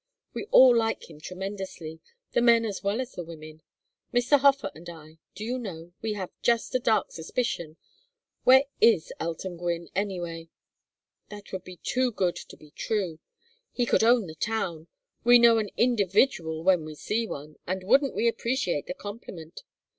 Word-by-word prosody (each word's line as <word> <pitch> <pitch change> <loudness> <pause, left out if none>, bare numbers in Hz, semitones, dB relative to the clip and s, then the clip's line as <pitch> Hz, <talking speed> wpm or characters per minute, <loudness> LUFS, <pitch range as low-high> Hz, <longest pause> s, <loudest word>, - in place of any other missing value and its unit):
We - - -5
all 260 - +7
like 225 -6 -1
him 150 -1 -14
tremendously, 185 -3 -6 0.3
the - - +2
men 235 -1 +5
as 205 -3 -4
well 200 +3 -1
as 260 0 -4
the 175 - -6
women. 155 -1 -11 0.5
Mr. 245 +4 +3
Hofer 280 0 +3
and 170 +3 -11
I 160 -1 -13 0.2
do 210 - -6
you 250 +3 -2
know, 175 -6 -8
we 220 -1 -2
have 190 -3 -5
just 235 -1 +1
a 255 - +2
dark 225 -3 +1
suspicion 170 -3 -3 0.7
where 260 +1 +7 0.2
is 225 -8 +4
Elton 170 +2 -4
Gwynne, 170 -1 -3
anyway? 175 -4 -3 0.8
That 205 -1 -11
would 190 -1 -5
be 185 -1 -11
too 255 0 +1
good 185 -5 0
to - - -10
be 150 -1 -17
true. 185 -6 -2 0.5
He 245 - 0
could 235 - +2
own 235 -1 +4
the 160 - -8
town. 170 -3 -3 0.4
We 240 +1 +8
know 235 -1 +6
an 210 -2 -2
individual 200 -7 +2
when 180 -3 +3
we 155 0 -8
see 225 +8 -2
one, 150 -2 -8
and 185 +1 -2
wouldn't 270 +7 +3
we 235 - +1
appreciate 230 - -1
the 180 - -4
compliment! 190 -6 -9
195 Hz, 170 wpm, -27 LUFS, 165-235 Hz, 0.8 s, We